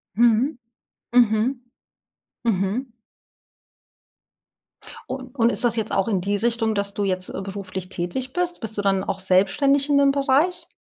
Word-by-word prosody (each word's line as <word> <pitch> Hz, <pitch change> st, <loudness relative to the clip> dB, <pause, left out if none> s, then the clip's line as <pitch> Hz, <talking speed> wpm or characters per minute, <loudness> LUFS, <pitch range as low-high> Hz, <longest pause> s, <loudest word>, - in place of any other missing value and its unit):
Mhm. 240 Hz, +5 st, +3 dB, 0.6 s
Mhm. 240 Hz, +1 st, +3 dB, 0.8 s
Mhm. 225 Hz, +4 st, -1 dB, 2.2 s
Un 260 Hz, -1 st, -5 dB
und 235 Hz, -2 st, +3 dB
ist -, -, 0 dB
das 235 Hz, -2 st, +3 dB
jetzt 220 Hz, -1 st, -2 dB
auch 195 Hz, -, +1 dB
in 200 Hz, -5 st, 0 dB
die 200 Hz, +3 st, -1 dB
Richtung, 225 Hz, 0 st, 0 dB
dass 200 Hz, 0 st, -1 dB
du 205 Hz, -, -2 dB
jetzt, 185 Hz, -2 st, -2 dB
äh, -, -, -5 dB
beruflich 190 Hz, -2 st, -6 dB
tätig 195 Hz, +9 st, -4 dB
bist? 355 Hz, -2 st, -1 dB
Bist 220 Hz, -2 st, -5 dB
du -, -, 0 dB
dann 195 Hz, -1 st, +1 dB
auch 195 Hz, -, -3 dB
selbstständig 200 Hz, +10 st, +2 dB
in 285 Hz, -, +4 dB
dem 280 Hz, -1 st, +5 dB
Bereich? 280 Hz, +6 st, +1 dB
225 Hz, 150 wpm, -23 LUFS, 195-260 Hz, 2.2 s, dem